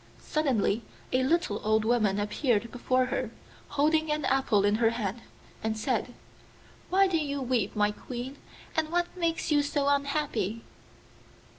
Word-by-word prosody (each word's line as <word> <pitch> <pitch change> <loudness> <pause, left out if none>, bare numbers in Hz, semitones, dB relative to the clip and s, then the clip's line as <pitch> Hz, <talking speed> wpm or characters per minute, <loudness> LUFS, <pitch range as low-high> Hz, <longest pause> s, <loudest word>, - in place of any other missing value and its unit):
Suddenly 250 -8 0 0.3
a 255 - +3
little 260 -6 +1
old 215 0 +2
woman 215 -4 +2
appeared 225 +2 0
before 255 +1 +1
her, 255 -2 -2 0.4
holding 310 +2 +2
an 300 -2 0
apple 260 -7 +3
in 205 +1 +3
her 225 - +5
hand, 230 -1 -3 0.4
and 220 0 -1
said, 245 +1 -1 0.7
'Why 390 +1 +5
do 370 -3 +1
you 285 -2 -2
weep, 245 -6 0
my 210 0 +3
Queen, 250 +5 -7 0.4
and 315 -1 +1
what 350 +1 -1
makes 335 -2 -1
you 295 -1 +5
so 285 -1 0
unhappy? 280 -7 0
255 Hz, 145 wpm, -29 LUFS, 220-295 Hz, 0.7 s, her